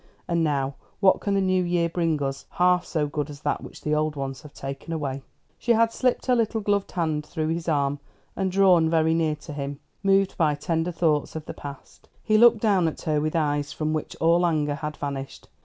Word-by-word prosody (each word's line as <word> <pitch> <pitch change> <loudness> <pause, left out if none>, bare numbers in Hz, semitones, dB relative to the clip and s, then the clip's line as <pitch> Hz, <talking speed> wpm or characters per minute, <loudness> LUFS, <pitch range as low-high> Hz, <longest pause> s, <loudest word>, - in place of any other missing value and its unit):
And 170 -1 +1
now, 140 -3 0 0.3
what 195 -2 +4
can 200 -1 0
the 195 - +2
new 185 -1 +2
years 175 -1 0
bring 165 -3 +1
us 135 0 -4
half 180 0 +3
so 155 -4 -1
good 145 0 -3
as 145 0 -10
that - - -1
which - - -11
the 150 - -1
old 155 0 0
ones 135 -1 -4
have 150 - -12
taken 135 +4 -7
away?" 140 -4 -3 0.4
She 240 - +2
had 230 0 +3
slipped 250 -1 0
her 250 - +3
little 225 -1 +1
gloved 205 -1 0
hand 155 -4 -1
through 155 0 -3
his 165 +1 -2
arm, 145 -2 +1 0.4
and 190 -1 -1
drawn 180 -4 +5
very 160 0 +3
near 160 -2 +1
to 150 +1 -10
him, 140 0 -5 0.2
moved 195 -1 +3
by 155 -4 +2
tender 165 +3 -1
thoughts 160 -4 0
of 155 -1 -5
the - - -6
past. 140 -1 -11
He 215 0 +3
looked 235 -2 +6
down 195 -6 +3
at 160 - -5
her 150 -2 +1
with 155 +1 -2
eyes 145 -2 0
from 155 0 -2
which 155 - -3
all 170 +2 +4
anger 155 -4 +1
had 150 +1 -5
vanished. 140 -1 -6
160 Hz, 220 wpm, -25 LUFS, 150-180 Hz, 0.4 s, looked